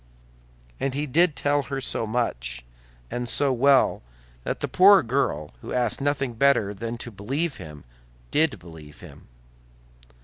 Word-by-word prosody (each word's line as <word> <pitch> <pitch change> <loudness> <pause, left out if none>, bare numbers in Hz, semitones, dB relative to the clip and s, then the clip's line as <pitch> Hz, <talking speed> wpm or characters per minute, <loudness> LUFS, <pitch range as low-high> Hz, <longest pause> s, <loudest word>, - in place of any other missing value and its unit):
And 135 -1 -2
he 145 +1 -1
did 160 +3 +2
tell 145 0 +1
her 135 0 -5
so 115 -3 -1
much, 60 - -3 0.5
and 120 -1 -3
so 140 +1 +2
well, 135 +2 +3 0.4
that - - -3
the - - -2
poor 195 0 +6
girl, 110 - -1
who - - -7
asked 120 0 0
nothing 135 -3 -1
better 115 -5 +2
than 115 +4 -5
to 120 - -8
believe 135 - -3
him, 75 -2 -11 0.5
did 155 -1 +1
believe 80 -4 -14
him. - - -14
125 Hz, 145 wpm, -24 LUFS, 100-140 Hz, 0.5 s, poor